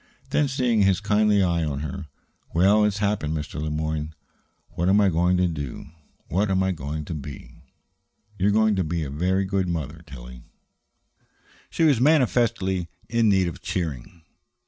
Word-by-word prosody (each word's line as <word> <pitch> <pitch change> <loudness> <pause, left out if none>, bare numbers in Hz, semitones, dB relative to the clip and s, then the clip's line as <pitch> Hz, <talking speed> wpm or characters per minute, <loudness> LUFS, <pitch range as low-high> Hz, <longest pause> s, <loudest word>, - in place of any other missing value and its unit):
Then, 150 - +2
seeing 125 -5 +1
his 95 -2 +3
kindly 105 -1 +3
eye 85 -2 +1
on 70 -2 -3
her: 80 +2 -6 0.5
"Well, 100 +5 +5
it's 105 -1 0
happened, 100 -7 -1
Mr. 75 0 -5
Le 75 - -2
Moyne. 75 0 -3 0.5
What 85 +2 -1
am 100 +2 +5
I 100 -2 +4
going 90 +2 +2
to 90 0 +2
do? 75 -3 -6 0.4
What 100 +5 0
am 95 0 +2
I 95 - +1
going 75 -2 -5
to 85 - -5
be?" 70 -4 -8 0.8
"You're 100 +1 +1
going 110 0 +3
to 95 - +1
be 85 0 -2
a 70 - -5
very 90 +6 0
good 95 -1 -1
mother, 80 -2 -4
Tillie." - - -11 1.3
She - - -1
was 140 -7 +4
manifestly 120 - +2 0.2
in 115 -1 +2
need 95 -3 +3
of 85 - -6
cheering. 80 -1 -4
90 Hz, 170 wpm, -24 LUFS, 75-105 Hz, 1.3 s, Well